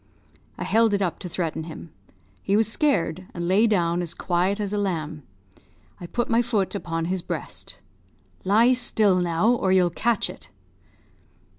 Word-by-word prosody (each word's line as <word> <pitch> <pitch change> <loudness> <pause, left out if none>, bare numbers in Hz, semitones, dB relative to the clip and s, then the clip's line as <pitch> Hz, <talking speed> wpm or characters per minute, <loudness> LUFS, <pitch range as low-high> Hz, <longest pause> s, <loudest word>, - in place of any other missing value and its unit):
I - - -4
held 225 -2 +3
it 200 - -1
up 175 - -2
to 180 - -6
threaten 165 -2 -3
him; 160 0 -9 0.5
he 200 - 0
was 220 -1 +3
scared, 185 - 0
and 170 -1 -3
lay 200 +5 +4
down 175 -4 +1
as 170 -2 -5
quiet 185 +3 0
as 205 -1 -2
a - - 0
lamb. 160 -6 -3 0.8
I 175 - -7
put 240 +7 -2
my 230 0 +3
foot 220 -5 -1
upon 165 -4 -3
his 185 +1 -2
breast. - - -6 0.6
'Lie 225 +6 +4
still, 220 -6 +3
now! 175 +4 +1
or 235 -6 +2
you'll 180 -2 +4
catch 235 +6 0
it.' - - -11
190 Hz, 165 wpm, -24 LUFS, 170-220 Hz, 0.8 s, lay